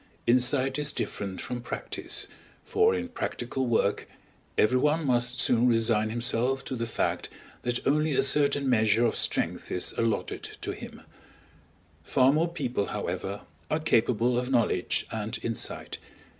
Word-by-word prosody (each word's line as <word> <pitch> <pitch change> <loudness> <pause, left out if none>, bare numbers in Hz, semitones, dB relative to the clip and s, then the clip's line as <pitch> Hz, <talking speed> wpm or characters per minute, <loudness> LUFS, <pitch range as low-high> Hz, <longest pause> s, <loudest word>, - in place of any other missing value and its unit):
Insight 130 +3 +2
is 150 0 +1
different 95 -2 -4
from 125 -1 -5
practice, 120 - -5 0.4
for 440 +1 +3
in 255 - -3
practical 135 - -3
work 110 -3 +1 0.5
everyone 150 +8 +3
must 120 -1 +2
soon 120 +1 +4
resign 115 -2 +2
himself 125 +3 0
to 130 - -3
the 115 -1 -3
fact - - -1 0.3
that 120 0 -2
only 150 +2 +2
a - - +4
certain 140 0 +3
measure 110 -1 +3
of 115 - +1
strength - - -1
is 90 - -1
alloted 115 -2 -2
to - - -3
him; - - -9 1.0
far 130 - +4
more 165 +3 +1
people, 130 - -2
however, 95 0 -4 0.3
are 155 - +1
capable 120 -4 +2
of 125 +1 -3
knowledge 120 -4 +1
and 110 0 -3
insight. 115 -1 -4
125 Hz, 140 wpm, -28 LUFS, 115-140 Hz, 1.0 s, soon